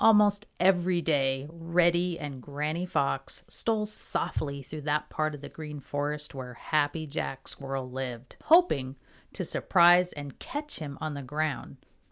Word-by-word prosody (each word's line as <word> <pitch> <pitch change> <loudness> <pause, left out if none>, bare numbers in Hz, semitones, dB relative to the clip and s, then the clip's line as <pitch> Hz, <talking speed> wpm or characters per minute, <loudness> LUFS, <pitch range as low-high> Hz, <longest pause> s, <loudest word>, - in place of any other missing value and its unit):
Almost 210 -2 +5
every 180 -1 +4
day 135 -3 +2
Reddy 170 +1 +2
and 140 -4 -6
Granny 150 +6 -2
Fox 135 -4 -1
stole 220 -2 0
softly 140 -8 -2
through 150 +3 -7
that 150 +1 -1
part 155 -1 0
of 140 - -11
the - - -7
Green 150 -2 -7
Forest 145 +2 -3
where 125 -2 -7
Happy 155 +3 0
Jack 140 -2 -4
Squirrel 135 -2 -3
lived, 125 -1 -6
hoping 225 - +5 0.4
to - - -3
surprise 175 +1 +5
and 145 -2 -8
catch 295 +1 -5
him 145 -3 -6
on 155 -1 -3
the 140 - -5
ground. 150 +3 -3
150 Hz, 150 wpm, -29 LUFS, 140-175 Hz, 0.4 s, Almost